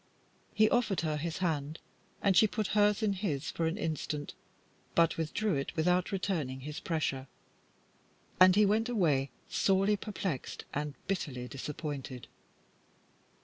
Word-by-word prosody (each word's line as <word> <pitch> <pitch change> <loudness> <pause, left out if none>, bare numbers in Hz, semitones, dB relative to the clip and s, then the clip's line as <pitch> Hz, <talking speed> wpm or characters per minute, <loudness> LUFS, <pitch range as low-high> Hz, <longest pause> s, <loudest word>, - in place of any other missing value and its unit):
He 215 0 +6
offered 225 -5 +1
her 155 -2 -1
his 165 +3 -3
hand, 155 -1 -1 0.5
and 195 -2 +4
she 220 - +7
put 210 -1 -2
hers 210 +1 +3
in 205 -2 +2
his 170 -8 -2
for 165 - -1
an 165 +4 -2
instant, 155 -5 -3 0.6
but 165 -1 +4
withdrew 175 +6 -1
it 135 -1 -2
without 180 +3 +2
returning 165 -10 -2
his 150 +2 -6
pressure, 145 -6 -2 1.1
and 185 0 +8
he 210 0 +6
went 220 +4 +2
away, 150 - +2 0.2
sorely 195 +2 +2
perplexed 195 - -4
and 145 0 -3
bitterly 135 -10 -3
disappointed. 140 -2 -6
165 Hz, 135 wpm, -31 LUFS, 145-200 Hz, 1.1 s, and